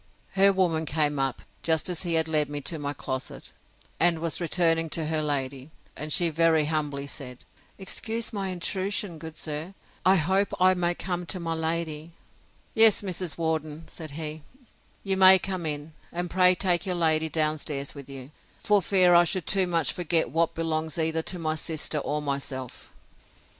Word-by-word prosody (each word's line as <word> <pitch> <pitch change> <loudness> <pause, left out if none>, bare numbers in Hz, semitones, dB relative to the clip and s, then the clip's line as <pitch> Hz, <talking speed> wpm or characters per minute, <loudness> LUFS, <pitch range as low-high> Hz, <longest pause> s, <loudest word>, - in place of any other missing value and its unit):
Her 195 +1 +5
woman 175 -4 +1
came 150 -2 +1
up, 135 -1 -2 0.2
just 160 -2 +1
as 180 -3 -2
he 170 -3 0
had 160 0 +2
led 150 -2 +1
me 145 0 -4
to 160 +3 -2
my 145 -1 -2
closet, 130 -2 -6 0.5
and 170 0 +4
was 165 +1 -2
returning 165 -1 +2
to 160 0 -3
her 155 0 0
lady; 140 -2 -3 0.3
and 150 0 -5
she 170 +2 +4
very 160 -1 +3
humbly 150 -2 -2
said, 125 -3 -9 0.3
Excuse 225 +4 -3
my 200 -2 -2
intrusion, 185 0 -2
good 160 0 -9
sir!—I 170 +4 -2
hope 190 +4 +1
I 185 0 +5
may 175 -1 0
come 180 -1 -4
to 185 - -3
my 165 -1 -3
lady. 160 0 -3 0.6
Yes, 220 -2 +6
Mrs. 180 -3 -3
Worden, 160 -1 -3
said 160 -2 -8
he, 155 -1 -5 0.6
you 195 -1 0
may 190 0 +9
come 185 -3 -3
in; 150 +1 -5 0.2
and 175 0 -4
pray 185 0 +6
take 175 -1 +1
your 180 - -1
lady 160 -2 +2
down 155 -1 +1
stairs 140 -2 -3
with 140 -2 -11
you, 135 0 -9 0.3
for 210 -1 +3
fear 185 0 +4
I 175 0 +7
should 175 0 -1
too 190 -2 +2
much 165 -5 +1
forget 165 -6 0
what 165 +2 +1
belongs 160 -1 -2
either 160 0 0
to 180 - -4
my 160 -2 -1
sister 155 -1 -2
or 150 +1 -3
myself! 140 -3 -5
160 Hz, 175 wpm, -26 LUFS, 150-180 Hz, 0.6 s, may